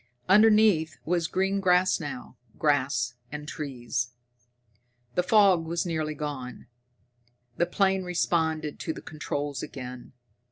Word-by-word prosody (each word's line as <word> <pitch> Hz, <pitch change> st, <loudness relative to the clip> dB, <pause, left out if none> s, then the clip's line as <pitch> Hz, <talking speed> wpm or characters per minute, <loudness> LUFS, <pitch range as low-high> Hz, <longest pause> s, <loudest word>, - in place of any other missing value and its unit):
Underneath 205 Hz, -7 st, +5 dB
was 170 Hz, 0 st, +1 dB
green 195 Hz, +3 st, 0 dB
grass 180 Hz, -1 st, +3 dB
now 145 Hz, -5 st, -7 dB, 0.2 s
grass 135 Hz, -5 st, +1 dB, 0.2 s
and 150 Hz, 0 st, -6 dB
trees! 120 Hz, -5 st, -4 dB, 1.0 s
The 180 Hz, -, +2 dB
fog 195 Hz, -3 st, +4 dB
was 170 Hz, +1 st, -1 dB
nearly 155 Hz, -3 st, -2 dB
gone. 140 Hz, -5 st, -6 dB, 0.9 s
The 175 Hz, -, +2 dB
plane 190 Hz, +1 st, +1 dB
responded 160 Hz, -4 st, 0 dB
to 160 Hz, -, -3 dB
the -, -, -9 dB
controls 145 Hz, -2 st, -4 dB
again. 125 Hz, -2 st, -8 dB
160 Hz, 115 wpm, -27 LUFS, 145-180 Hz, 1.0 s, Underneath